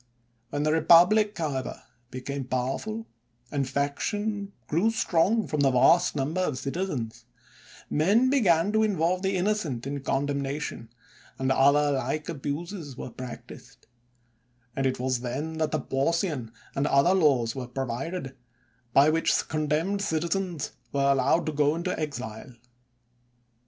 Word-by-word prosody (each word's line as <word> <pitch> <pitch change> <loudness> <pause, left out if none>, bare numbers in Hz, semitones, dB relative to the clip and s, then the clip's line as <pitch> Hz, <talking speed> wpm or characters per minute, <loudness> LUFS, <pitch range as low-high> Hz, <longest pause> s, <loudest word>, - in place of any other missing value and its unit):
When 145 +2 -2
the 155 - +2
republic, 180 +7 +5
however, 145 -6 -3 0.3
became 135 +1 -5
powerful, 135 - -3 0.5
and 140 -3 -1
faction 200 - -2
grew 175 +9 +2
strong 215 0 +2
from 150 - -3
the 140 -1 +4
vast 165 +8 +4
number 150 +6 -1
of 150 -8 -1
citizens, 135 -4 -4 0.6
men 205 +12 +3
began 195 - +3
to 220 0 +2
involve 185 -4 +1
the 190 0 0
innocent 180 - -1
in 140 +1 -3
condemna 140 +1 -1
tion, 115 -6 -6 0.5
and 135 0 0
other 145 +2 +4
like 140 +3 -2
abuses 150 0 -5
were - - -6
practised; 125 -1 -10 0.9
and 135 0 +1
it 130 - -2
was 130 -1 0
then 145 +6 -4
that 155 -1 +1
the 155 - -1
Porcian 140 - -1 0.2
and 140 +2 0
other 140 +7 +4
laws 135 -11 +3
were 130 -2 -5
provided, 135 +4 -4 0.6
by 145 +3 +6
which 165 +1 +1
condemned 155 +6 0
citizens 170 -1 -1 0.2
were 140 0 +2
al 135 - +3
lowed 140 +6 +2
to 155 - -1
go 145 +1 +2
into 175 +2 -2
exile. 125 -5 -5
150 Hz, 135 wpm, -27 LUFS, 135-175 Hz, 0.9 s, by